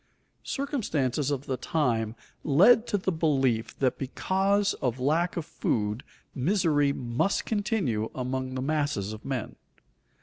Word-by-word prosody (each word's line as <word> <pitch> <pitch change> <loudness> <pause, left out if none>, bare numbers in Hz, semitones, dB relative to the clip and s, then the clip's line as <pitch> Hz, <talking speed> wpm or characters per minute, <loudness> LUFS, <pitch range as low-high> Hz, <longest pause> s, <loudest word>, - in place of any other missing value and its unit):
_ - - -41 0.4
Circumstances 155 - -1
of 140 -1 -2
the 130 - -2
time 115 -9 0 0.3
led 210 - +5
to 205 - +1
the 190 0 -1
belief 135 -9 +1
that 130 -2 0
because 195 +8 +1
of 125 -1 -1
lack 160 +8 +1
of 165 - -2
food 105 -2 -1 0.3
misery 150 -2 +2
must 125 +8 -1
continue 200 - 0
among 130 0 -3
the 130 - -2
masses 145 -9 -1
of 110 - -10
men. 130 -4 -4
140 Hz, 135 wpm, -27 LUFS, 125-185 Hz, 0.4 s, led